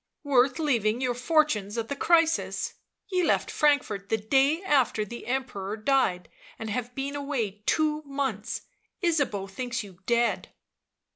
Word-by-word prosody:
" -, -, -58 dB
Worth 260 Hz, -2 st, +3 dB
leaving 240 Hz, -8 st, +1 dB
your 255 Hz, -1 st, 0 dB
fortunes 245 Hz, -6 st, +1 dB
at 225 Hz, -1 st, -2 dB
the 280 Hz, -, -3 dB
crisis? 330 Hz, +2 st, +2 dB, 0.4 s
Ye 365 Hz, -1 st, +2 dB
left -, -, +1 dB
Frankfort 270 Hz, -10 st, +1 dB
the 225 Hz, -, +2 dB
day 270 Hz, -, +2 dB
after 265 Hz, -, +2 dB
the 235 Hz, +3 st, -9 dB
Emperor 230 Hz, -6 st, -3 dB
died, 215 Hz, -7 st, +1 dB, 0.3 s
and 220 Hz, -1 st, -5 dB
have 245 Hz, +2 st, -3 dB
been 275 Hz, +1 st, -3 dB
away 245 Hz, -8 st, -3 dB
two 305 Hz, -1 st, +2 dB
months. 245 Hz, -6 st, -2 dB, 0.4 s
Ysabeau 285 Hz, -, +1 dB
thinks 240 Hz, +4 st, -4 dB
you 190 Hz, -3 st, -13 dB
dead." 235 Hz, 0 st, +1 dB
250 Hz, 145 wpm, -27 LUFS, 215-285 Hz, 0.4 s, Worth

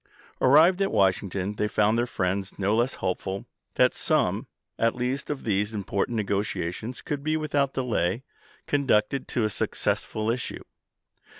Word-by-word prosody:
Arrived 165 Hz, +8 st, +6 dB
at 195 Hz, -, +1 dB
Washington 95 Hz, +1 st, +1 dB
they 105 Hz, -, +1 dB
found 105 Hz, +1 st, +2 dB
their 120 Hz, +1 st, +1 dB
friends 95 Hz, -2 st, -2 dB
no 100 Hz, +2 st, +1 dB
less 120 Hz, +3 st, +1 dB
hopeful 95 Hz, +1 st, -3 dB, 0.3 s
that -, -, +4 dB
some -, -, 0 dB, 0.3 s
at 115 Hz, 0 st, +2 dB
least 125 Hz, +3 st, -2 dB
of 145 Hz, -2 st, -3 dB
these 105 Hz, 0 st, 0 dB
impor 100 Hz, -1 st, -1 dB
tant 120 Hz, -, -4 dB
negotiations 100 Hz, +1 st, -2 dB
could 145 Hz, -1 st, -3 dB
be 155 Hz, +1 st, +1 dB
without 145 Hz, -3 st, 0 dB
delay 120 Hz, -4 st, 0 dB, 0.4 s
conducted 135 Hz, -2 st, +1 dB
to 120 Hz, -, 0 dB
a 110 Hz, -, +2 dB
successful 110 Hz, +2 st, -1 dB
issue. 120 Hz, 0 st, -4 dB
110 Hz, 145 wpm, -26 LUFS, 100-130 Hz, 0.4 s, Arrived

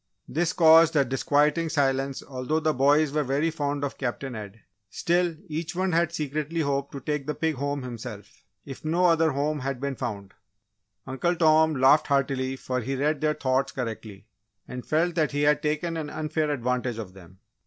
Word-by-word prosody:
This 165 Hz, +4 st, 0 dB
caused 165 Hz, -1 st, +6 dB
a 140 Hz, -2 st, +4 dB
disquieting 150 Hz, +5 st, +1 dB
silence 135 Hz, -3 st, 0 dB
although 135 Hz, +4 st, -2 dB
the 155 Hz, -1 st, +1 dB
boys 145 Hz, +3 st, +3 dB
were 155 Hz, -, +1 dB
very 145 Hz, +5 st, 0 dB
fond 145 Hz, -2 st, -2 dB
of 140 Hz, -, -4 dB
Captain 130 Hz, 0 st, -3 dB
Ed; 105 Hz, -1 st, -8 dB, 0.3 s
still 175 Hz, -, 0 dB
each 160 Hz, +2 st, -4 dB
one 185 Hz, +1 st, 0 dB
had 170 Hz, 0 st, +2 dB
secretly 155 Hz, +1 st, -2 dB
hoped 140 Hz, -1 st, -1 dB
to 140 Hz, -, -5 dB
take 150 Hz, +1 st, -3 dB
the 150 Hz, -, -2 dB
pig 160 Hz, -1 st, 0 dB
home 140 Hz, 0 st, -3 dB
himself, 115 Hz, -4 st, -9 dB, 0.2 s
if 135 Hz, -2 st, -9 dB
no 170 Hz, +4 st, +1 dB
other 165 Hz, -2 st, +4 dB
home 145 Hz, +2 st, -1 dB
had 135 Hz, -1 st, -3 dB
been 140 Hz, 0 st, -3 dB
found. 105 Hz, -7 st, -5 dB, 0.7 s
Uncle 135 Hz, +7 st, -1 dB
Tom 160 Hz, -1 st, +4 dB
laughed 135 Hz, +3 st, +4 dB
heartily 135 Hz, -2 st, 0 dB
for 130 Hz, -1 st, -3 dB
he 135 Hz, +4 st, -3 dB
read 145 Hz, +2 st, 0 dB
their 155 Hz, 0 st, +1 dB
thoughts 130 Hz, 0 st, 0 dB
correctly, 110 Hz, -5 st, -6 dB, 0.4 s
and 125 Hz, -1 st, -8 dB
felt 165 Hz, +3 st, +1 dB
that 155 Hz, -3 st, 0 dB
he 145 Hz, 0 st, 0 dB
had 150 Hz, 0 st, +3 dB
taken 155 Hz, +3 st, -1 dB
an 155 Hz, -2 st, -4 dB
unfair 155 Hz, 0 st, -2 dB
advantage 125 Hz, -3 st, -1 dB
of 105 Hz, -5 st, -7 dB
them. 95 Hz, -1 st, -15 dB
145 Hz, 185 wpm, -26 LUFS, 130-155 Hz, 0.7 s, caused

